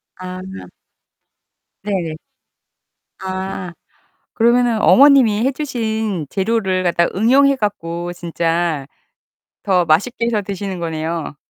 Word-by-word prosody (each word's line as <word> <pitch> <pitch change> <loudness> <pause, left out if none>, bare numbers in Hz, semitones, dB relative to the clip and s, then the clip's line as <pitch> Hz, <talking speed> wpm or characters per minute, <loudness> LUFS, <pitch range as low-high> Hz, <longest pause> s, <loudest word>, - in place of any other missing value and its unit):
아. 185 0 -7 1.4
네네. 180 -6 -2 1.1
아. 190 -1 -5 0.6
그러면은 235 -1 +2
어머님이 255 -6 +5
해 270 - +1
주신 220 - -3
재료를 190 -2 0
갖다가 170 -1 +1
응용해 270 +5 +4
갖고 175 -5 -3
진짜 170 -3 -2 0.8
더 185 -3 +2
맛있게 205 +9 +1
해서 225 -3 0
드시는 195 -2 -5
거네요. 160 -1 -4
190 Hz, 210 characters per minute, -18 LUFS, 170-225 Hz, 1.4 s, 어머님이